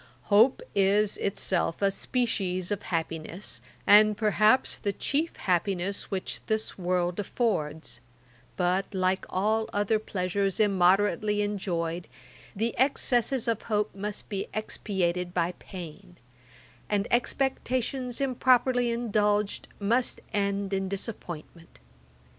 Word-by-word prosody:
Hope 225 +6 +5
is 200 +1 +3
itself 185 -4 -1
a 200 -1 +3
species 195 -5 -1
of 205 - -1
happiness, 165 - -4 0.2
and, 210 0 +7
perhaps, 215 +3 +3
the 200 - -1
chief 300 - -1
happiness 185 +1 -1
which 190 -1 -4
this 220 0 -1
world 180 -1 -1
affords: 160 - -1 0.6
but, 185 +1 +1
like 185 0 0
all 215 +4 0
other 205 +2 +1
pleasures 195 -1 -1
immoderately 205 +1 +3
enjoyed, 175 -4 -2 0.5
the 225 +3 -1
excesses 260 -2 +2
of 230 -2 0
hope 210 -1 -1
must 205 +1 -5
be 195 -2 -3
expiated 180 -4 -2
by 175 0 +1
pain; 175 -1 -10 0.7
and 205 +1 +1
expectations 255 0 0
improperly 255 -2 +3
indulged, 210 -3 0
must 235 +5 +1
end 200 -1 0
in 195 -1 -1
disappointment. 175 - -7
200 Hz, 105 wpm, -28 LUFS, 185-220 Hz, 0.7 s, and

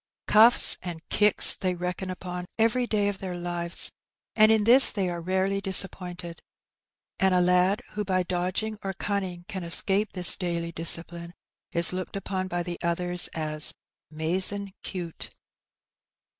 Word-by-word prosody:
Cuffs 225 +3 +5
and 175 -3 -8
kicks 210 -1 +6
they 185 -1 -4
reckon 180 +2 -6
upon 180 -1 -8
every 235 +2 0
day 205 -2 -1
of 200 -2 -5
their 185 -2 -7
lives; 175 0 -3 0.4
and 215 0 +4
in 220 -1 +1
this 250 +5 +9
they 195 -4 -3
are 170 -1 -6
rarely 190 +3 -2
disappointed, 180 -3 -1 0.8
and 190 -1 +1
a - - +2
lad 180 +3 0
who 210 0 -5
by 185 -2 -2
dodging 185 +5 -4
or 195 0 -5
cunning 190 -3 -5
can 190 -2 -7
escape 195 +5 +1
this 180 -2 +6
daily 170 -2 -5
discipline 170 +1 -2 0.4
is 170 0 +3
looked 185 +1 -7
upon 190 -1 -5
by 175 -1 -4
the 175 0 -8
others 175 +1 0
as 155 -1 -1 0.4
'''mazin^ 185 +5 -2
cute.' 175 -3 -8
185 Hz, 145 wpm, -24 LUFS, 175-195 Hz, 0.8 s, this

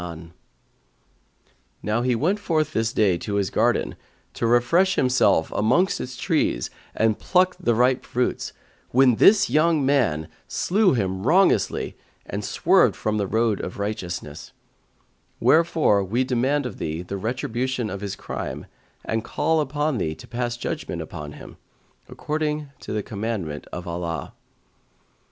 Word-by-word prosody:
'[FN#145] 85 -1 -8 1.5
Now 105 +3 0
he 125 0 +1
went 175 - +1
forth 155 -5 0
this 110 0 0
day 95 -7 +2
to 105 - -4
his 100 -2 0
garden, - - +1 0.4
to 115 - -1
refresh 120 +11 +3
himself 125 -10 +3
amongst 175 - +2
its 125 -1 -6
trees - - 0 0.2
and 110 -1 +1
pluck 185 0 +2
the 120 - +1
ripe 125 +2 +2
fruits, 125 +1 -2 0.4
when 125 -2 +4
this 210 0 +6
young 155 -2 +2
man 115 - +1 0.2
slew 200 -1 +2
him 95 -4 -1
wrongously 190 +5 +2 0.3
and - - -5
swerved - - +3
from 110 0 -1
the 100 -2 -1
road 110 -1 +1
of 90 - -6
righteousness; 90 -8 -5 0.9
wherefore 160 -11 +3
we 115 +7 0
demand 130 +3 0
of 125 - -6
thee 80 +2 -3
the 95 +2 -6
retribution 120 +2 -2
of 100 - -5
his 100 -2 -4
crime - - -6 0.4
and 110 0 -1
call 160 +5 +1
upon 150 -2 -1
thee 80 -3 -2
to - - -13
pass 120 0 -3
judgement - - -4
upon 75 0 -8
him, - - -12 0.5
according 150 -1 -3
to - - -8
the 105 -1 -1
commandment 100 -9 -4
of 90 +1 -6
Allah." 85 -1 -4
120 Hz, 140 wpm, -24 LUFS, 100-145 Hz, 1.5 s, this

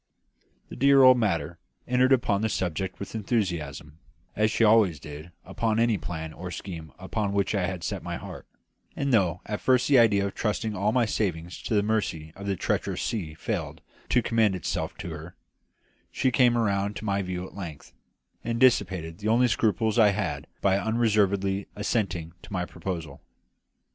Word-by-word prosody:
The - - -8
dear 140 +1 +5
old 130 -1 +8
mater 85 -6 -1 0.3
entered 125 +1 +3
upon 110 -6 +3
the 110 - +1
subject 95 -1 -2
with 100 - -7
enthusiasm, 85 - -2 0.4
as 110 +1 +2
she 110 - +1
always 105 -8 +4
did 75 +4 -10
upon 110 +3 -1
any 115 -4 +2
plan 80 -2 -5
or 90 +2 -7
scheme 85 -4 -7
upon 100 +2 -2
which 100 +1 +1
I 95 -3 +1
had 90 -2 -5
set - - -3
my - - -4
heart; - - -9 0.5
and 140 -2 -1
though 90 -6 +2
at 105 0 -4
first 130 -1 +3
the 140 -3 +6
idea 105 -4 +4
of 100 - -3
trusting 110 0 -2
all 100 +3 +1
my 120 0 +3
savings 90 -6 -2
to 110 - -2
the 100 - +3
mercy 90 -8 -2
of 100 +1 -8
the 100 - 0
treacherous - - -1
sea 85 -9 -3
failed - - -4 0.3
to - - +3
commend 110 -4 +2
itself 90 - -3
to 85 - -6
her, 80 +3 -9 0.8
she 130 - +1
came 120 -2 +4
round 100 -2 0
to - - -6
my 100 -1 0
view 90 -1 -4
at - - -12
length, 85 -7 -8 0.5
and 115 0 -2
dissipated 95 -9 +2
the 105 - -4
only 120 +3 +4
scruples 110 0 +1
I 105 -2 +7
had 100 - -1
had 85 -9 -3
by 100 0 +3
unreservedly 100 -3 +1
assenting 95 -6 -2
to - - -14
my 90 -2 -1
proposal. 85 -5 -6
100 Hz, 180 wpm, -27 LUFS, 90-110 Hz, 0.8 s, old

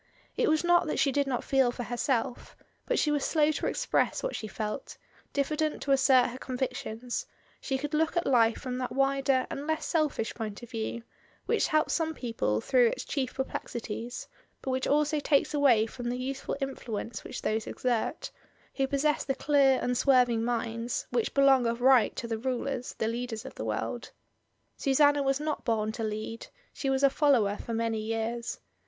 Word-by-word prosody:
It - - +2
was 310 +1 +2
not 345 -1 +4
that - - -1
she 285 -3 +3
did 280 +1 +1
not 250 -3 -1
feel 265 -3 +3
for 245 - -5
herself, 240 0 -2 0.3
but - - +1
she 300 - +2
was 290 -2 0
slow 310 -1 +3
to - - -2
express - - 0
what - - -2
she 215 - -5
felt, 215 +4 -5 0.3
diffident 305 +2 0
to 280 - -1
assert 260 -2 +5
her 255 - -8
convictions; 250 - -4 0.3
she 270 - -2
could 295 +3 -5
look 320 +2 +1
at 345 - +1
life 230 -3 +4
from 255 -1 -4
that 255 - -3
wider 270 -1 +2
and 285 +2 -5
less 315 -1 -1
selfish 305 -9 0
point 220 -1 -6
of 240 - -11
view, 230 0 -4 0.4
which - - +2
helps 310 0 +2
some 320 -1 0
people 225 - -1
through 250 - +4
its - - -3
chief 265 -4 -2
perplexities, 240 -2 -5 0.4
but 265 - -2
which 260 0 -1
also 300 +1 +2
takes 285 0 +2
away 265 -7 +4
from 240 +1 -5
the 245 - -2
useful 265 +2 -4
influence 240 -5 -4
which - - -7
those 220 0 -1
exert, 240 -3 -2 0.4
who 270 -1 0
possess 285 +2 +1
the 270 - -1
clear 275 -2 +4
unswerving 250 -2 +3
minds, 230 0 -2
which 240 -2 -1
belong 270 -3 +5
of 235 +1 -1
right 255 -2 +5
to 235 - -4
the 225 -1 -3
rulers, 255 +1 -3
the 220 - 0
leaders 235 0 -4
of - - -8
the - - -6
world. - - -3 0.7
Susanna 285 +1 +4
was 270 0 +1
not 300 0 -3
bom 220 -2 0
to 225 0 -5
lead; 215 +1 -4 0.3
she 275 - -2
was 270 +1 +1
a 275 - +7
follower 255 -10 +3
for 230 - -5
many 225 -1 0
years. 225 +2 -3
255 Hz, 185 wpm, -29 LUFS, 230-280 Hz, 0.7 s, a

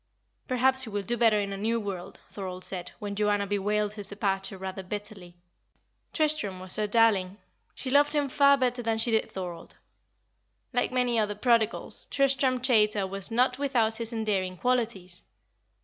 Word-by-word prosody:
"Perhaps 260 +1 +3
he 250 - 0
will 205 -1 -3
do 240 +5 -1
better 225 -3 +3
in 200 -1 -3
a - - -5
new 225 +3 0
world," 195 -4 -6
Thorold 185 -2 -7
said, 180 -2 -6
when 205 -2 -5
Joanna 205 0 +1
bewailed 205 +1 -1
his 205 -2 -7
departure 195 -1 -2
rather 190 0 -6
bitterly. 195 -2 -8 0.8
Tristram 300 - +1
was 185 0 0
her 215 -1 0
darling; 205 -4 +2 0.4
she 260 - -4
loved 290 +2 +4
him 290 -1 +1
far 280 +1 +4
better 250 -2 0
than 225 -1 -1
she 225 +1 +2
did 220 - +1
Thorold. 180 -3 -7 1.0
Like 245 - 0
many 250 -2 +1
other 210 -1 -1
prodigals, 230 0 +1
Tristram 270 -2 +2
Chaytor 215 -5 +3
was 195 +1 -1
not 250 +3 +1
without 235 -6 +1
his 230 0 -4
endearing 200 -5 -2
qualities. 215 -7 -2
215 Hz, 165 wpm, -27 LUFS, 195-245 Hz, 1.0 s, loved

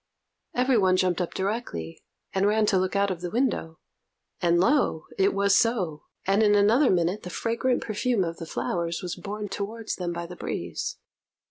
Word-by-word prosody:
Every 250 -1 +3
one 185 -2 +4
jumped 185 -1 +1
up 175 - -3
directly, 190 - -3 0.3
and 195 +1 +2
ran 215 +1 +3
to 195 -2 +3
look 185 +1 -1
out 200 0 +2
of 175 -2 -4
the 175 - -3
window, 220 -9 -1 0.6
and, 170 0 +3
lo! 190 - +2
it 195 +1 +3
was 200 0 +3
so; 185 -10 +1 0.2
and 195 +3 +3
in 210 -1 +5
another 225 +7 +5
minute 180 +3 +1
the 180 - -7
fragrant 235 +6 0
perfume 220 -1 0
of 165 -1 -4
the 165 - -7
flowers 170 +1 -2
was 180 -1 -3
borne 210 +1 -5
towards 215 +3 -4
them 175 -2 -2
by 170 0 -4
the 175 +1 -9
breeze. - - -4
195 Hz, 185 wpm, -26 LUFS, 175-220 Hz, 0.6 s, in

